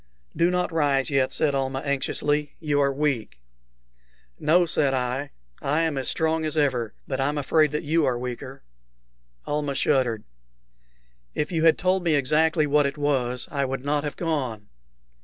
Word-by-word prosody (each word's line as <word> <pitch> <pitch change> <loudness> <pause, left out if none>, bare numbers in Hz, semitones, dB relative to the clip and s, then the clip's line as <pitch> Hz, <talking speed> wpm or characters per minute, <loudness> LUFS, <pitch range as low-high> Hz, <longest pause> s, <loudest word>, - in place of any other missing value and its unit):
"Do 170 +1 +3
not 180 0 0
rise 145 -3 +1
yet," 135 -2 +2
said 145 -2 +1
Almah, 135 0 -1
anxiously; 145 +1 -1
"you 145 -3 +1
are 140 0 +3
weak." 135 - -1 1.0
"No," 175 +4 +4
said 145 -4 +1
I; 130 +3 -2 0.3
"I 150 +4 +1
am 160 -3 0
as 135 -1 -2
strong 160 0 0
as 155 0 -2
ever; 125 -7 0
but 135 - -3
I'm 145 +2 0
afraid 150 +1 +2
that 150 - -2
you 160 +2 +2
are 125 -2 +1
weaker." 125 +2 -6 0.8
Almah 145 -1 -2
shuddered. 125 -7 +1 1.1
"If 150 - -1
you 165 -2 +1
had 165 - +6
told 185 0 +1
me 165 -3 +2
exactly 155 +3 +2
what 145 0 +3
it 140 - -5
was, 130 -4 -1
I 140 -2 0
would 135 0 -4
not 145 0 0
have 150 - -4
gone." 130 -11 -3
145 Hz, 165 wpm, -25 LUFS, 135-155 Hz, 1.1 s, had